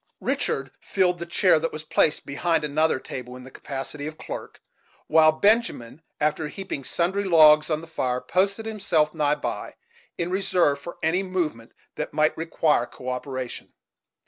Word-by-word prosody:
Richard - - -1
filled 180 -2 +1
the 170 - -5
chair 175 -1 +4
that 165 +1 -2
was 155 0 -7
placed 155 0 +1
behind 160 +3 0
another 150 0 +1
table, 125 -1 -7
in 125 - -10
the 130 - -12
capacity 145 +1 -6
of 155 0 -8
clerk; - - -8 0.5
while 155 -1 +5
Benjamin, 185 - +1 0.2
after 150 +1 0
heaping 190 -4 -6
sundry 185 +8 0
logs 155 -4 +6
on 155 -1 0
the - - -9
fire, 130 -6 -2
posted 200 - 0
himself 190 -8 +1
nigh 150 0 +1
by, 150 - -5 0.4
in 170 +1 -2
reserve 180 -6 +2
for 170 +5 -9
any 170 +4 +2
movement 170 -12 -3 0.3
that - - -4
might 155 0 +3
require 160 -6 +1
co 130 - -8
operation. 130 -1 -5
155 Hz, 160 wpm, -25 LUFS, 145-180 Hz, 0.5 s, logs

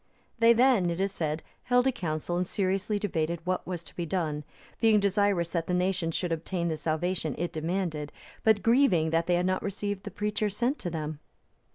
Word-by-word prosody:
They 230 0 +7
then, 235 -7 +4
it 170 +1 -2
is 195 0 +1
said, 155 -4 -2 0.2
held 245 0 +3
a 265 - +4
council 170 - -3
and 180 0 0
seriously 195 +2 0
debated 170 -5 -1
what 185 0 -1
was 175 -2 -4
to 160 - -15
be 175 - -2
done, 155 -5 -1 0.4
being 220 -2 +5
desirous 200 -3 +1
that 165 -2 -1
the 180 - +1
nation 180 -2 0
should 175 +1 -2
obtain 170 +1 -1
the 160 - -2
salvation 160 0 -1
it 175 +2 -2
demanded, 160 -2 -2 0.3
but 220 -2 +4
grieving 225 - +4
that 165 +1 +1
they 175 - +3
had 175 +1 +1
not 185 0 +1
received 205 0 -3
the - - -5
preacher 210 0 -1
sent 240 +8 -1
to 175 - -3
them. 155 -2 -4
180 Hz, 200 wpm, -28 LUFS, 165-205 Hz, 0.4 s, They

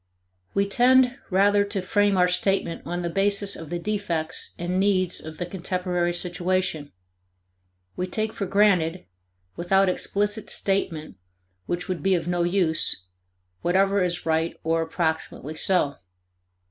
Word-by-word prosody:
We 200 0 +2
tend 255 +4 +4
rather 200 +1 +4
to 200 0 -2
frame 205 +1 +1
our 180 0 +4
statement 180 -1 0
on 175 +1 -3
the 170 - -2
basis 200 +2 0
of 165 -2 -9
the 175 - -2
defects 170 -4 -2
and 175 +2 -2
needs 190 -2 +1
of 160 0 -9
the 175 - -3
contemporary 180 -1 -2
situation; 175 -3 -1 1.0
we 180 - -3
take 215 +3 -2
for 200 - -4
granted, 185 -4 +2 0.5
without 190 +2 +2
explicit 205 +3 -1
statement 165 - 0 0.5
which 175 +1 -3
would 180 -5 -3
be 190 +2 +2
of 170 -1 -3
no 175 0 0
use, 170 - +2 0.6
whatever 195 +3 +2
is 180 -1 -1
right 160 0 0
or 165 0 +1
approximately 160 -2 -2
so. 155 -3 +2
180 Hz, 135 wpm, -24 LUFS, 170-200 Hz, 1.0 s, tend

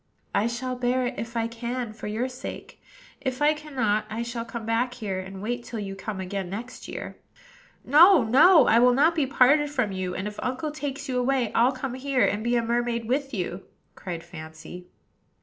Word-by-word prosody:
"I 205 +3 +2
shall 250 +2 -3
bear 250 +1 0
it, 245 - -2
if 230 +1 -5
I 225 - +1
can, 235 0 -4
for 215 - -8
your 220 +4 -1
sake; 255 -1 -9 0.4
if 260 -2 -3
I 295 +1 +4
cannot, 255 -9 -1
I 225 +2 -3
shall 235 0 -4
come 235 -1 -7
back 240 +2 0
here, 200 -5 -3
and 190 +1 -8
wait 240 +2 -3
till 235 - -7
you 195 -2 -5
come 195 0 -5
again 190 0 -4
next 230 +6 -7
year." - - -7 0.7
"No, 320 +2 +7
no! 300 +10 +6
I 230 - +5
will 245 0 +5
not 305 +5 +4
be 305 -5 0
parted 280 +3 +4
from 255 -8 -1
you; 185 -1 -3
and, 190 - -3
if 210 0 -7
uncle 260 +5 -2
takes 285 -1 -5
you 255 -1 0
away, 250 -2 +1
I'll 240 +3 +4
come 260 -1 -5
here, 260 0 +1
and 210 +1 -1
be 240 +1 +1
a 235 - +2
mermaid 235 0 -1
with 270 +3 -1
you," 185 -3 -3 0.3
cried 170 -3 -6
Fancy. 160 +2 -10
240 Hz, 200 wpm, -26 LUFS, 210-260 Hz, 0.7 s, No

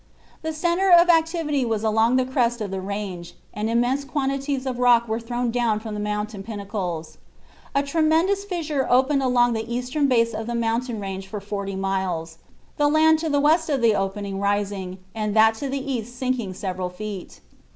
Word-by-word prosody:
The 320 - -3
centre 345 +4 +1
of 350 0 +7
activity 325 -4 +2
was 225 -2 -1
along 225 +2 +3
the 255 0 +3
crest 245 -2 0
of 205 -3 -4
the 190 -1 -3
range, 190 -3 -5 0.2
and 215 +1 -2
immense 245 +4 +1
quantities 275 0 -2
of 255 -2 -3
rock 240 -1 +4
were 220 +1 -1
thrown 240 +1 -2
down 230 -3 +1
from 220 -1 -7
the 210 - -4
mountain 210 0 -3
pinnacles. 195 -7 -5 0.6
A 280 - +3
tremendous 325 +7 +2
fissure 320 -8 -2
opened 265 +3 +3
along 245 -2 +3
the 225 +1 -4
eastern 250 +4 0
base 230 -3 +2
of 220 +1 -4
the 240 - -2
mountain 235 0 -1
range 195 -1 -5
for 210 +2 -5
forty 200 -1 -4
miles, 185 -4 -2 0.4
the 295 - +3
land 315 +1 +4
to 320 0 -2
the 285 -1 +2
west 315 +3 +3
of 275 -5 0
the 225 -2 +5
opening 195 0 -2
rising 200 -2 -1 0.2
and 215 -1 -2
that 220 0 +6
to 275 +3 -4
the 275 0 -3
east 240 -1 -4
sinking 250 -7 -2
several 185 -2 -3
feet. 200 0 -7
235 Hz, 185 wpm, -23 LUFS, 205-275 Hz, 0.6 s, of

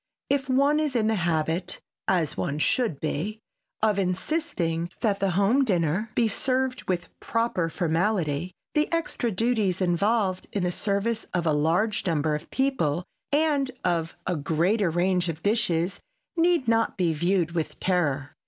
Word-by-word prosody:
If 275 -1 +1
one 280 +3 +3
is 300 -4 0
in 225 -3 +2
the 220 - +2
habit, 170 -1 0 0.3
as 170 -5 +1
one 145 - -2
should 185 - +1
be, 170 +8 -3 0.4
of 210 -2 +3
insisting 180 - -1
that 205 -3 +1
the 195 - +1
home 220 +8 +4
dinner 185 - 0
be 235 - +3
served 255 +3 0
with 180 -1 -1
proper 230 -7 0
formality, 170 -1 0 0.2
the 300 0 +1
extra 330 -7 0
duties 215 -3 +1
involved 190 +2 +1
in 200 - 0
the 180 - +1
service 205 +4 -1
of 175 -2 0
a 155 - +3
larger 175 +8 +1
number 155 -1 +1
of 150 - -4
people 180 - 0 0.3
and 290 -2 +2
of 165 -2 0
a 180 - 0
greater 170 +7 +1
range 180 +1 +1
of 160 -1 -5
dishes 200 -5 +1 0.4
need 340 -5 +2
not 225 -1 +2
be 175 -3 +2
viewed 170 +1 +1
with 165 -2 -3
terror. 145 -7 0
185 Hz, 155 wpm, -26 LUFS, 165-230 Hz, 0.4 s, home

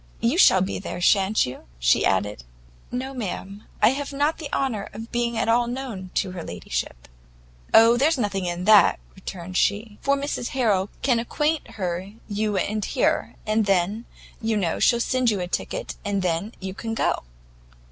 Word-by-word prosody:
"You 235 +6 +1
shall 190 - +7
be 190 - -2
there, 190 - -6
shan't 195 +3 +3
you?" 125 - -8
she - - +3
added. 100 -5 -1 0.5
"No, 260 +2 -3
ma'am, 200 -3 -5 0.2
I - - +8
have 280 +3 -3
not 290 +4 0
the 295 -3 -6
honour 230 -7 -1
of 225 +3 -8
being 235 -1 -1
at 225 - 0
all 235 +1 +3
known 240 -7 -5
to 190 - 0
her 180 -2 -6
ladyship." - - -5 0.6
"Oh, 230 +1 +7
there's 295 +4 +3
nothing 200 -5 -1
in 175 +1 -3
that," 210 0 +6
returned 185 -1 -6
she, 205 +1 0
"for 280 0 +2
Mrs 275 -3 -3
Harrel 205 -6 +2
can 250 -4 +3
acquaint 295 +1 -1
her 185 +1 -3
you 210 -1 -1
are - - +1 0.2
here, - - 0
and 215 -1 +1
then, 195 +4 +1 0.4
you 220 -1 0
know, 175 -5 -1
she'll 235 - +4
send 255 0 +1
you 210 -3 0
a 180 - -2
ticket, - - -3
and 200 -2 -1
then 180 +5 -1
you 190 -1 -5
can 225 +3 -4
go." - - +1
210 Hz, 175 wpm, -24 LUFS, 185-240 Hz, 0.6 s, I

